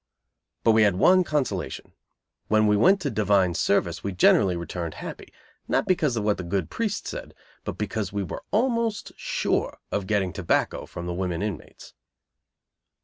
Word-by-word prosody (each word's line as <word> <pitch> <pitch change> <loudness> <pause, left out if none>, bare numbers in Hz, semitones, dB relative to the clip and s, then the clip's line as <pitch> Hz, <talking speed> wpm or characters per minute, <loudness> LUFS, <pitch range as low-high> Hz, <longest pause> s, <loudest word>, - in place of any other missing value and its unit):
But 115 - +5
we 110 0 +4
had 100 -3 +4
one 185 - +5
consolation. 150 -5 -3 0.5
When 110 0 +3
we 105 0 +4
went 190 - +5
to 145 -5 -1
divine 100 -4 +2
service 85 -1 0
we 100 - -2
generally 95 +1 +4
returned 85 -1 -5
happy; - - -8 0.4
not - - +1
because 150 -9 +1
of 110 - -1
what 105 -1 +1
the 95 - -5
good 85 -2 -2
priest 215 -3 -2
said, - - -7 0.3
but - - -4
because 105 -2 -3
we 100 0 -2
were 90 - -6
almost 230 -1 0
sure - - -1
of 100 -2 -2
getting 95 -4 0
tobacco 95 -4 0
from 85 - -7
the 90 - -3
women 90 0 -2
inmates. 95 -11 -7
105 Hz, 165 wpm, -25 LUFS, 90-130 Hz, 0.5 s, But